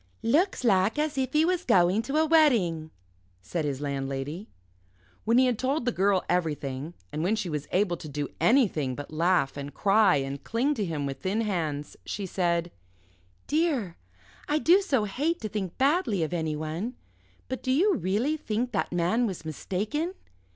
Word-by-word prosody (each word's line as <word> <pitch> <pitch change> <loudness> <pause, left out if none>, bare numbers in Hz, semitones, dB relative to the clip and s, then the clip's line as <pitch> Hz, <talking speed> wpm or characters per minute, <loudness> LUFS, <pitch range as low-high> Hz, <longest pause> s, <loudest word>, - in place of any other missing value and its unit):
"Looks 305 - +2
like 200 +1 +3
as 305 0 0
if 260 -1 -1
he 305 +1 +4
was 360 0 0
going 180 - +4
to 275 +6 -2
a 315 - +4
wedding," 230 - +3 0.5
said 160 - -3
his 140 -1 -3
landlady. 140 +6 -4 0.8
When 230 +2 +3
he 260 - +6
had 245 -4 0
told 265 0 0
the 245 - +2
Girl 195 -2 +2
everything, 150 -3 -2 0.2
and 150 - -3
when 190 +6 +1
she 205 -5 -3
was 150 -2 -4
able 185 -2 +2
to 155 - -9
do 145 0 -3
anything 185 - +2
but 145 +2 -8
laugh 165 -4 +2
and 140 0 -5
cry 200 -1 +4
and 135 0 -3
cling 250 +6 0
to 215 -7 -2
him 155 -5 -3
with 135 -1 -4
thin 200 +4 0
hands, 160 -9 -3
she 205 - -4
said 175 -2 0 0.7
"Dear 290 - 0 0.5
I 300 - +2
do 350 +5 +5
so 270 - +1
hate 295 - -1
to 215 - -3
think 190 -4 -4
badly 270 - +2
of 160 - -3
anyone. 160 +7 -3 0.5
But 260 - -4
do 255 - -1
you 375 +10 +4
really 240 - 0
think 240 -2 -2
that 205 - -1
man 180 +8 +1
was 185 -5 -6
mistaken? 215 - -3
195 Hz, 175 wpm, -27 LUFS, 160-260 Hz, 0.8 s, he